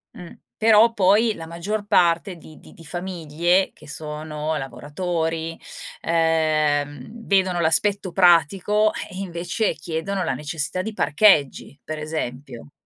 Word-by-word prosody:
Mh, 175 - -10 0.2
però 225 +1 +5
poi 210 +2 +3
la 165 - -8
maggior 190 +6 -4
parte 175 0 +2
di 155 -2 -15
di - - -16
di 165 - -15
famiglie 175 +1 -1
che - - -17
sono 150 +1 -4
lavoratori, 160 +4 -3 0.4
ehm, 155 -4 +1 0.2
vedono 190 -3 +2
l'aspetto 190 +4 +1
pratico 190 +4 +3
e - - -6
e - - -5
invece 175 +3 -2
chiedono 165 +5 -3
la - - -1
necessità 150 +5 -3
di 220 +2 -5
parcheggi, 150 -6 +2
pre 155 -1 -6
esempio 135 -4 -6
165 Hz, 125 wpm, -22 LUFS, 155-190 Hz, 0.4 s, però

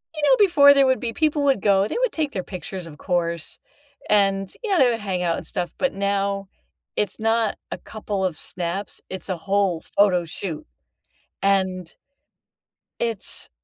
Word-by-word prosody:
you 305 - -4
know, 280 -2 +6
before 300 -8 +7
there 275 -1 +5
would 260 -1 +2
be 235 -2 -3
people 305 0 +1
would 275 -7 +2
go, 200 0 +3
they - - -5
would - - +2
take 305 -3 -1
their 185 - -2
pictures, 185 0 -7
of 150 -2 -11
course, 170 -1 -2 0.5
and, 195 -2 +2
you 450 - -3
know, 390 - +3
they 255 - +6
would 230 - -2
hang 190 -3 -2
out 170 -1 +1
and - - -6
stuff, 175 -3 -2
but, 275 - 0
now, 200 0 -1 0.5
it's 205 -1 -1
not 225 0 +1
a - - -3
couple 205 -3 -4
of 180 -4 -2
snaps, 180 +3 -4
it's 190 0 -4
a 185 - -1
whole 195 -1 0
photo 185 -4 +4
shoot. 165 0 -5 0.8
And 185 -3 +1 1.1
it's 230 -4 -1
200 Hz, 175 wpm, -23 LUFS, 185-230 Hz, 1.1 s, before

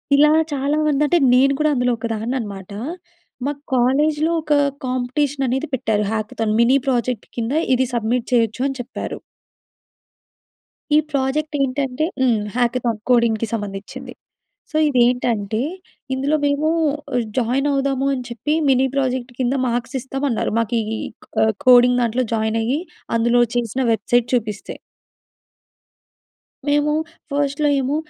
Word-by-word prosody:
ఇలా 295 +2 +6 0.2
చాలా 285 +1 0
మంది 295 -2 +1
అంటే, 345 +4 +3 0.2
నేను 270 +2 +5
కూడా 305 0 +3
అందులో 250 -2 +1
ఒకదాన్ననమాట. 220 -3 -4 0.8
మా 285 - +1 0.2
కాలేజ్‌లో 295 +6 +2
ఒక 305 -1 0 0.3
కాంపిటీషన్ 260 +2 -1
అనేది 265 +5 -1
పెట్టారు. 220 -4 0
హ్యాకథాన్. 215 0 -2
మినీ 250 +4 +5
ప్రాజెక్ట్ 250 -3 -1
కింద 235 +3 -1 0.2
ఇది 260 +1 +1
సబ్మిట్ 235 +1 -1
చేయొచ్చు 230 0 +2
అని 270 - -4
చెప్పారు. 245 - -6 1.8
ఈ - - +7
ప్రాజెక్ట్ 295 +2 -1
ఏంటంటే 270 +1 -1 0.2
హ్మ్. 240 -5 +3 0.2
హ్యాకథాన్. 240 -2 0
కోడింగ్‌కి 230 -2 +3
సంబంధిచింది. 205 -2 -6 0.6
సో, 310 - -1
ఇదేంటంటే, 240 -4 +1 0.5
ఇందులో 275 +3 0
మేము 285 +2 +1 0.7
జాయిన్ 255 +3 +1
అవుదాము 275 -1 0
అని 255 -2 -3
చెప్పి, 240 +6 -2 0.2
మిని 265 0 +4
ప్రాజెక్ట్ 260 -2 -1
కింద 255 0 +1
మార్క్స్ 240 +2 -2
ఇస్తామన్నారు. 270 -3 -2
మాకు 230 0 -2
ఇ - - -3
ఇ - - -5 0.3
క - - -41 0.2
ఆహ్, 220 0 +2
కోడింగ్ 250 0 +6
దాంట్లో 240 +2 0
జాయిన్ 220 0 0
అయ్యి 255 +6 0 0.4
అందులో 235 +1 +3
చేసిన 240 +2 -1
వెబ్‌సైట్ 235 +2 +1
చూపిస్తే. 215 -4 -2 1.9
మేము 290 +1 +2 0.4
ఫస్ట్‌లో 285 +1 +1
ఏమో, 270 +2 -1
250 Hz, 125 wpm, -20 LUFS, 230-275 Hz, 1.9 s, ఈ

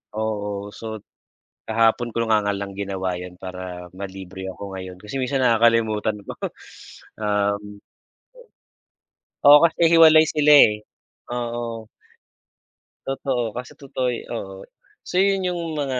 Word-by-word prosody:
Oo, 105 -2 -3
sot 110 -2 -8 0.7
kahapon 115 +2 +2
ko 115 - 0
nga 110 -1 +3
nga 100 -1 0
lang 100 -1 -5
ginawa 95 -2 -3
yun, 90 0 -9
para 90 -1 -7
ma-libre 95 -1 -8
ako 100 +1 -8
ngayon 95 -1 -7
kasi 105 +5 -10
minsan 135 +2 -1
nakakalimutan 115 -2 +2
ko. - - -6 0.9
Um 105 0 -1 1.7
Oo, 145 +1 +10
kasi 170 0 +2
hiwalay 160 -1 +8
sila, 150 -1 +1
eh, 105 -7 +6 0.5
oo. 120 -2 -4 1.2
Totoo, 130 -4 -2
kasi 125 +1 -7
totoo 130 -2 -3
yo 120 - -4
oo. 95 -4 -6 0.5
So 180 - -1
yun 195 -1 +2
yung 175 - -4 0.2
mga 135 -3 -1
110 Hz, 125 wpm, -22 LUFS, 100-125 Hz, 1.7 s, Oo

